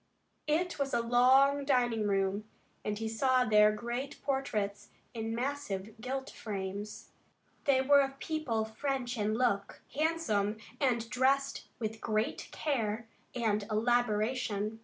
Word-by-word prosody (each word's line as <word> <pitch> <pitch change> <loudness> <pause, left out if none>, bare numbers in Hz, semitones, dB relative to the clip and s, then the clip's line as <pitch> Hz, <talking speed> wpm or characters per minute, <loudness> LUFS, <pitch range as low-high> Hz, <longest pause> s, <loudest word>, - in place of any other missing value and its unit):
It 330 +2 0
was 275 -3 0
a - - +3
long 260 +4 +5
dining 240 -6 +2
room, 195 +1 0 0.4
and 210 0 -2
he 225 +1 -3
saw 255 +3 +2
there 210 -1 +6
great 240 +6 -4
portraits 210 -8 -2 0.2
in 225 -1 -3
massive 235 -6 -3
gilt 265 +2 -4
frames. 200 0 -6 0.5
They 270 -3 +4
were 280 +1 +6
of 270 0 -2
people 275 -8 -1
French 245 +2 -2
in 215 -1 0
look, 200 -5 0
handsome, 270 -9 0 0.2
and 240 -5 +1
dressed 275 +2 +1
with 220 -2 -4
great 215 +1 -1
care 225 -6 -1 0.3
and 220 -4 +1
elaboration. 220 -1 0
235 Hz, 125 wpm, -32 LUFS, 215-270 Hz, 0.5 s, there